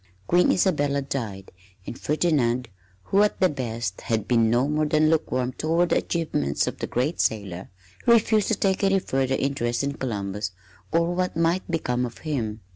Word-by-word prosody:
Queen 175 - +4
Isabella 145 -7 +1
died, 110 -8 -5 0.3
and - - -6
Ferdinand, 130 -6 0 0.3
who, 195 - +2
at 210 - +1
the 185 -2 +4
best, 115 -8 -4
had 110 -3 -1
been 115 -2 +3
no 120 +4 +2
more 150 +1 +1
than 155 +1 +3
lukewarm 130 -5 0
toward 165 +5 +1
the - - +3
achievements 75 - -1
of - - -5
the - - -3
great 130 +8 -1
sailor, 95 -4 -2 0.4
refused 220 -2 +4
to 220 - +2
take 190 0 0
any 195 0 +4
further 135 -7 0
interest 125 -3 -1
in 140 0 -1
Columbus 100 -6 -4 0.4
or 170 +1 +2
what 180 -1 -1
might 170 +3 +1
become 125 -7 -1
of 115 - -12
him. 115 -8 -2
140 Hz, 170 wpm, -25 LUFS, 115-170 Hz, 0.4 s, Queen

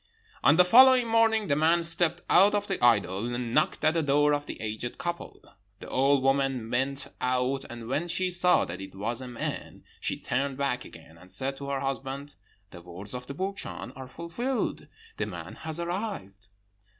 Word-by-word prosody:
"On 145 - +6
the 180 +1 +6
following 255 +4 +7
morning 225 -1 +3
the 145 - +1
man 165 +3 +3
stepped 170 0 +5
out 200 +3 +5
of 205 0 0
the 195 -9 -3
idol 105 -3 +2
and 120 -1 -4
knocked - - +1
at 155 - +4
the 165 - +1
door 145 0 +3
of 145 0 -2
the - - -7
aged 110 +2 -5
couple. 175 0 -5 0.4
The - - -10
old 135 +1 +2
woman 135 -4 0
went 135 +3 -1 0.2
out, 130 +2 0
and 120 -1 -8
when 145 +7 -1
she 180 +2 0
saw 180 0 +4
that 90 +3 -7
it 95 - -10
was 115 +5 -2
a 130 - -7
man, 120 -1 -6 0.2
she - - -2
turned 135 +1 -2
back 140 -3 -2
again, 80 0 -14
and 95 +1 -13
said 135 +1 -1
to 140 0 -7
her 135 -1 -2
husband, 135 +1 -4 0.4
'The 85 - -11
words 90 +4 -7
of 125 0 -6
the 140 - -7
Burchan 195 +4 -5
are 130 -1 -9
fulfilled; 235 - -3 0.3
the - - -2
man - - -7
has 160 +1 -5
arrived.' 170 - -5
140 Hz, 190 wpm, -27 LUFS, 120-170 Hz, 0.4 s, following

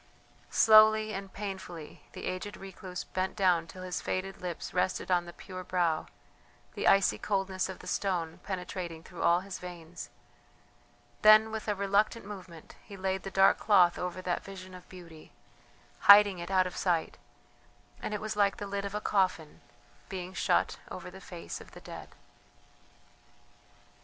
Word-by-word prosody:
Slowly 215 -1 +6
and 195 0 -6
painfully 190 -6 -7
the - - -7
aged 195 +3 -4
recluse 185 -1 -7
bent 185 0 -3
down 180 -5 +2
till 185 +2 -10
his 180 -1 -3
faded 190 +1 -3
lips 175 -2 -5
rested 185 +1 0
on 175 -1 +3
the 175 - -8
pure 185 +1 -9
brow, 170 -3 0 0.7
the - - -2
icy 195 -1 +4
coldness 195 -2 -1
of 190 - -6
the - - -13
stone 170 -4 -2
penetrating 180 -3 -5
through 175 -1 -9
all 175 +1 +4
his 195 -1 -7
veins 175 -1 -9 1.1
then 215 +1 +7
with 220 0 -5
a 210 - +1
reluctant 200 +3 +1
movement 185 -5 -10
he 200 - -11
laid 190 0 -1
the 195 - -6
dark 195 0 +4
cloth 185 -5 +4
over 180 +1 -4
that 180 -1 -1
vision 185 -1 -10
of 180 -1 -13
beauty, 170 -4 -13 0.7
hiding 200 -2 +8
it 170 +1 -6
out 185 -1 +3
of 180 - -5
sight; 175 -3 -1 0.8
and - - -4
it 210 - -3
was 215 0 -3
like 200 -1 +2
the 205 - -5
lid 200 0 -3
of 200 +1 -5
a 210 - -2
coffin 185 -7 0 0.5
being 185 -1 -6
shut - - +1
over - - -8
the - - -12
face - - -8
of - - -15
the - - -11
dead. - - -9
185 Hz, 160 wpm, -30 LUFS, 180-200 Hz, 1.1 s, hiding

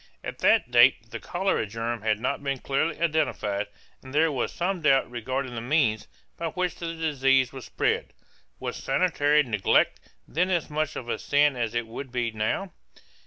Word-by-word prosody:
At - - -6
that 120 - +3
date 120 -2 +5
the 115 - -5
cholera 190 - -1
germ 115 +2 -3
had 110 -1 +1
not 125 - -1
been 140 -1 -1
clearly 145 +5 -1
identified 145 -11 0 0.3
and 130 +1 -10
there 160 +1 +4
was 130 -4 -2
some 180 +1 -2
doubt 140 -3 +4
regarding 130 +2 -3
the 115 - -4
means 120 -5 +1 0.3
by 165 - -2
which 180 +1 -1
the 165 -1 -5
disease 135 -5 +2
was 130 -3 -8
spread. - - -1 0.5
Was - - -4
sanitary 150 0 +2
neglect 105 -7 +2 0.3
then 180 +4 0
as 175 -5 -1
much 155 0 -1
of 120 - -6
a - - -2
sin 145 -1 +3
as 120 -2 -2
it 120 -1 0
would 120 +3 -8
be 120 -2 -1
now? 110 - -2
135 Hz, 175 wpm, -26 LUFS, 120-155 Hz, 0.5 s, date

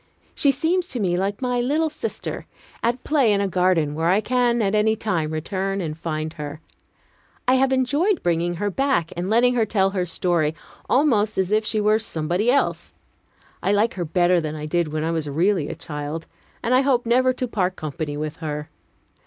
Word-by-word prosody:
She 285 - +2
seems 340 +6 0
to 250 - -5
me 180 -4 +1
like 200 +6 -2
my 250 -1 +1
little 305 +5 +1
sister, 305 - -5 0.3
at 235 +2 0
play 280 -7 +3
in 200 - +2
a 200 - +1
garden 180 -5 +2
where 160 +2 0
I 190 +3 +4
can 240 +1 +1
at 200 -2 +1
any 215 +1 +3
time 180 -8 -1
return 190 +5 -2
and 160 -4 -3
find 155 -1 -4
her. 150 0 -7 0.9
I 255 - +5
have 265 0 +3
enjoyed 285 +10 +1
bringing 175 0 0
her 205 +4 -2
back, 265 - 0
and 175 +2 -3
letting 240 +3 +4
her 235 -3 +2
tell 195 -2 +2
her 185 -2 -1
story, 165 -2 0 0.3
almost 225 -6 +2
as 190 0 0
if 215 +1 +2
she 215 - +1
were 210 +1 +3
somebody 180 +1 -1
else. 275 +3 0 0.7
I 200 - +1
like 215 +3 +2
her 180 - -3
better 175 +2 +2
than 155 -1 -4
I 150 0 -5
did 170 +2 0
when 155 0 -3
I 165 - 0
was 160 -3 -2
really 165 +1 +1
a - - -5
child, 150 +2 -5 0.4
and 240 - +1
I 255 - +5
hope 260 -3 +2
never 255 +2 +3
to 255 0 -3
part 185 -5 -1
company 155 -1 -4
with 150 0 -4
her. 150 -2 -5
195 Hz, 200 wpm, -23 LUFS, 165-240 Hz, 0.9 s, I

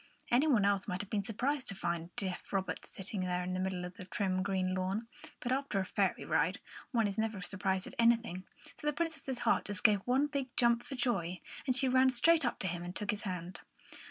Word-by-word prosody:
Any 255 +6 +5
one 235 -9 +4
else 200 -1 +2
might 180 -2 -2
have 205 - -10
been 210 - +1
surprised 255 +7 -1
to 195 - +2
find 170 -2 -2
deaf 185 -3 -4
Robert 195 -1 -2
sitting 195 0 -5
there, 180 0 -1
in 180 0 -3
the 185 - -1
middle 185 -1 -1
of 180 +1 -9
the 185 - -7
trim 185 0 0
green 185 -1 0
lawn, 190 +5 -1 0.3
but 245 - -3
after 270 -6 0
a 190 - 0
fairy - - 0
ride - - +1 0.3
one 230 -4 +3
is 200 +1 -3
never 220 -2 -1
surprised 190 0 -1
at - - -8
anything; 230 -6 +3 0.4
so 295 - -4
the 300 - +2
Princess's 290 -5 -2
heart - - +2
just 205 0 -2
gave 210 -3 +6
one 260 +3 +3
big 280 -3 -2
jump 235 -1 +5
for 270 - -7
joy, 195 -9 -1 0.3
and 255 - +3
she 265 +1 +3
ran 260 +1 +5
straight 325 +6 +4
up 240 - 0
to 190 - -2
him 175 -1 -2
and 175 +1 -6
took 210 - -1
his 205 0 -3
hand. 180 -3 -5
205 Hz, 230 wpm, -33 LUFS, 185-250 Hz, 0.4 s, gave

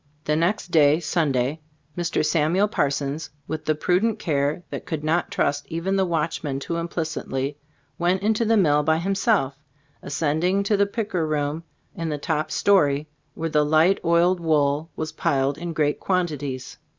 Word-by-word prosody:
The 150 - +1
next 180 +5 0
day 150 -1 +5
(Sunday), 150 -4 0 0.4
Mr. 170 -3 0
Samuel 165 +6 +2
Parsons, 145 -3 -1 0.2
with 155 +1 -5
the 155 - +1
prudent 185 +8 +1
care 150 -2 -1
that - - -6
could 160 -4 -3
not 160 +3 +1
trust 145 0 -1
even 170 +4 -1
the 190 -1 +2
watchman 155 -4 -2
too 170 +4 -3
implicitly, 155 -4 -3 0.4
went 180 +3 +1
into 220 +2 +2
the 225 0 +3
mill 150 -6 +4
by 160 +1 +2
himself, 190 - +1 0.4
ascending 165 +7 0
to 205 +1 +2
the 200 0 +3
picker 200 -6 -2
room 150 +1 -1 0.3
in 165 -1 -4
the 150 - -2
top 155 0 -2
story, 150 -8 +2 0.3
where 165 0 -3
the 150 -1 +3
light, 160 +6 +3
oiled 170 +2 +3
wool 155 -1 +1
was 155 0 -4
piled 140 -2 0
in 175 0 -4
great 150 -2 0
quantities. 145 -8 -2
160 Hz, 160 wpm, -24 LUFS, 145-180 Hz, 0.4 s, day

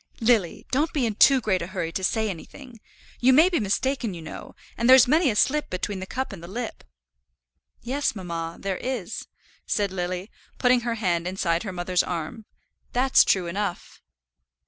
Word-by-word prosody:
"Lily, 225 -7 +1
don't 295 +5 +1
be 275 -5 +1
in 220 - -1
too 270 +6 +6
great 200 -6 0
a 170 - -4
hurry 180 -4 -4
to 190 - -4
say 220 +3 +1
anything. 230 - -9 0.4
You 255 +2 +5
may 315 +7 +6
be 350 - 0
mistaken, 230 +1 -1
you 170 - -8
know; 155 - -9 0.2
and 235 +2 0
there's 260 -2 +8
many 310 +2 +3
a 215 - -1
slip 295 +8 +2
between 190 +2 -3
the 190 - -6
cup 260 0 -4
and 170 -4 -10
the - - -8
lip." 230 +5 -6 1.0
"Yes, 265 +1 -1
mamma, 170 -3 -5
there 195 -2 -3
is," 240 -6 -4 0.4
said 200 -2 0
Lily, 180 +2 -4 0.3
putting 250 -1 +4
her 235 -1 -2
hand 175 -5 -1
inside 175 -3 0
her 200 - -5
mother's 180 0 0
arm, 175 +6 -5 0.5
"that's 255 +2 +5
true 185 -2 +1
enough." 180 +1 -4
210 Hz, 180 wpm, -25 LUFS, 180-250 Hz, 1.0 s, there's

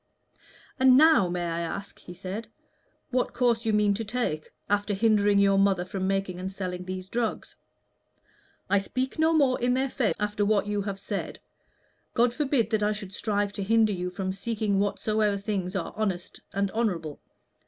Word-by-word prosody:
"And 260 -1 +7
now, 305 - +6
may 175 0 -2
I 170 0 -2
ask," 170 +4 -5
he 175 - -11
said, 195 +5 -6 0.6
"what 250 -1 0
course 235 -2 +1
you - - +3
mean 210 -1 +3
to 220 +3 -3
take, 210 -9 -2 0.2
after 205 0 0
hindering 205 -1 +3
your 195 -1 +4
mother 195 -3 +2
from 190 0 -3
making 195 -2 -1
and 190 +1 -4
selling 180 -2 -5
these 185 0 -5
drugs? 230 +2 -3 1.1
I 200 - +3
speak 255 +8 -3
no 320 +1 +4
more 275 -6 +3
in 245 +1 +2
their 265 +1 0
favor 235 -6 0
after 210 0 0
what 205 -1 +2
you 205 0 -1
have 200 -1 -4
said. - - -4 0.8
God 240 0 +3
forbid 265 -5 0
that 220 -1 +1
I 210 0 +2
should 200 -2 -8
strive 205 -1 -1
to 205 - -4
hinder 220 +1 +3
you 180 -1 -3
from 190 0 -3
seeking 205 -1 -1
whatsoever 210 +1 +1
things 195 -2 -3
are 185 - -3
honest 195 -5 -3
and 200 0 -1
honorable. 180 -10 -2
205 Hz, 175 wpm, -27 LUFS, 190-225 Hz, 1.1 s, And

